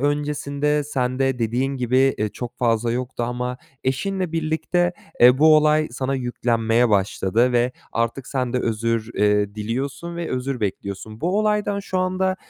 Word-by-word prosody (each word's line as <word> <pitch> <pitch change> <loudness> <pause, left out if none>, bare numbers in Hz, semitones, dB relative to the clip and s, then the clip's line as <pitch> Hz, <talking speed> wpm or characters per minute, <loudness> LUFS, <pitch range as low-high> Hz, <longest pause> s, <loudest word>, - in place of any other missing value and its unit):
öncesinde 145 0 0
sende 130 -1 -1
dediğin 125 +4 0
gibi, 130 +2 +2
eee, 105 0 0
çok 120 +3 -8
fazla 115 -1 +1
yoktu 125 0 -3
ama 125 +1 -2 0.3
eşinle 180 +7 -1
birlikte, 165 +2 0 0.3
eee, 125 +2 +7
bu 155 +1 +7
olay 155 0 +3
sana 130 +2 -2
yüklenmeye 120 -2 +1
başladı 100 +4 +2
ve 120 +1 +2 0.2
artık 115 +3 -1
sen 130 -2 -2
de 125 - +1
özür, 115 -1 -1
eee, 105 0 +2
diliyorsun 130 +10 -4
ve 170 -1 -4
özür 130 0 -2
bekliyorsun. 105 +2 -4
Bu 185 +4 +1
olaydan 210 -1 +1
şu 190 -1 -3
anda 185 +1 0
130 Hz, 150 wpm, -22 LUFS, 115-150 Hz, 0.3 s, eee